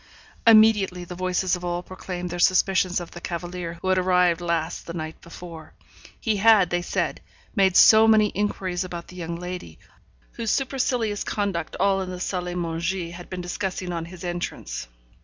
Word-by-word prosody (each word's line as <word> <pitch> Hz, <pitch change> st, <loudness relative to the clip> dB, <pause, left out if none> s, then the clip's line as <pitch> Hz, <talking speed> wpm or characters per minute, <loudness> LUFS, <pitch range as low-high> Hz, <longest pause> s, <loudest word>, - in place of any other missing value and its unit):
Immediately 215 Hz, -5 st, +5 dB
the 175 Hz, 0 st, -8 dB
voices 185 Hz, +1 st, 0 dB
of 180 Hz, -, -9 dB
all 175 Hz, 0 st, -2 dB
proclaimed 180 Hz, -1 st, -6 dB
their 175 Hz, -, -4 dB
suspicions 185 Hz, 0 st, +3 dB
of 175 Hz, -, -8 dB
the 175 Hz, -, -10 dB
cavalier 175 Hz, 0 st, -5 dB
who 190 Hz, -, 0 dB
had 185 Hz, 0 st, +3 dB
arrived 180 Hz, -2 st, +3 dB
last 170 Hz, -1 st, -2 dB
the 170 Hz, -, -6 dB
night 155 Hz, -1 st, -6 dB
before. 170 Hz, -1 st, -11 dB, 0.5 s
He 220 Hz, -2 st, 0 dB
had, 205 Hz, -3 st, +5 dB
they 175 Hz, 0 st, +1 dB
said, -, -, -2 dB, 0.3 s
made 190 Hz, -3 st, +4 dB
so 220 Hz, 0 st, +8 dB
many 215 Hz, -1 st, +5 dB
inquiries 190 Hz, -3 st, -1 dB
about 175 Hz, -2 st, -7 dB
the 180 Hz, -, -12 dB
young 170 Hz, -1 st, -4 dB
lady, 180 Hz, +1 st, -7 dB, 0.5 s
whose 230 Hz, -2 st, -4 dB
supercilious 250 Hz, -5 st, 0 dB
conduct 195 Hz, -6 st, -2 dB
all 195 Hz, 0 st, +2 dB
in 185 Hz, -, -4 dB
the 180 Hz, -1 st, -6 dB
salle 180 Hz, -1 st, -2 dB
à 180 Hz, 0 st, -4 dB
manger 170 Hz, +1 st, -2 dB
had 175 Hz, +1 st, -10 dB
been 185 Hz, -1 st, -5 dB
discussing 180 Hz, 0 st, -3 dB
on 165 Hz, -1 st, -3 dB
his 175 Hz, +1 st, -11 dB
entrance. 175 Hz, -, -4 dB
180 Hz, 175 wpm, -24 LUFS, 175-195 Hz, 0.5 s, so